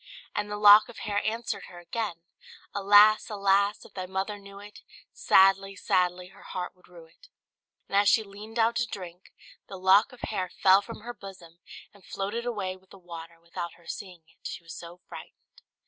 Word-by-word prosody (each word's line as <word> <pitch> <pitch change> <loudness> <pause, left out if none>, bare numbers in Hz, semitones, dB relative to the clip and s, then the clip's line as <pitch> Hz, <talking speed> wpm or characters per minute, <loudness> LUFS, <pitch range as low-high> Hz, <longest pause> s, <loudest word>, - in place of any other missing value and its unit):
And 210 0 -2
the 210 - -4
lock 210 +2 +8
of 240 - -12
hair 205 -1 0
answered 225 +1 -3
her 175 - -13
again 175 -1 -5 0.5
"Alas! 205 +2 +5
alas! 200 0 +1
if - - -16
thy 185 -1 -5
mother 195 +2 -3
knew 200 0 -13
it, 205 +1 -13 0.3
Sadly, 195 +1 +4
sadly 180 -1 0
her - - -18
heart 180 0 -6
would 180 - -24
rue 170 -2 -14
it." 160 +1 -22 0.6
And - - -4
as 200 0 +5
she 220 - +4
leaned 210 +2 -12
down 230 0 +3
to 240 0 -1
drink, 180 -3 -9 0.4
the 195 - -8
lock 190 +6 +4
of 250 - -15
hair 185 -4 -3
fell 190 +2 +4
from 225 +1 -10
her 240 +2 -7
bosom 185 -5 -13 0.3
and 200 -2 -20
floated 210 +7 -4
away 195 -6 -3
with 190 0 -23
the 195 - -14
water, 170 -2 -11
without 170 +1 -7
her 170 - -21
seeing 180 -4 -8
it, 165 - -11
she - - -7
was 165 - -10
so 175 +1 -11
frightened. - - -13
195 Hz, 195 wpm, -27 LUFS, 180-210 Hz, 0.6 s, lock